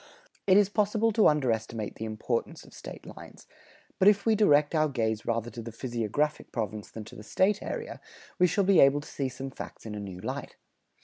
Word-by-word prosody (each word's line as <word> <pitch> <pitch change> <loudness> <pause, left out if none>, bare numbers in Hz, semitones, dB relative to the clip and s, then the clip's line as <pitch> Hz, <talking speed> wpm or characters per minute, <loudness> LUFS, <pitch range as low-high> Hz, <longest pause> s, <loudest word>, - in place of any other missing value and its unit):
It 190 0 +6
is 205 -2 +5
possible 215 +2 +1
to 220 0 +5
underestimate 115 -7 0
the 110 - -6
importance 110 +2 -3
of - - -17
State - - -10
lines, - - -12 0.5
but 190 - +5
if 205 -1 +5
we 225 - +4
direct 150 -9 +4
our 155 -1 +2
gaze 110 -5 -2
rather 115 0 -1
to 120 - -7
the 115 +1 -7
physiographic 120 +5 -2
province 110 -3 -4
than 110 - -8
to 105 - -13
the - - -9
State 190 - +1
area, 475 -1 -5 0.4
we 180 - +6
shall 200 +4 +1
be 195 -2 +5
able 140 +1 +6
to - - -12
see 135 -2 -3
some 130 +2 -7
facts - - -9
in 110 - -6
a 105 - -5
new 95 -3 -7
light. - - -5
135 Hz, 205 wpm, -28 LUFS, -, 0.5 s, It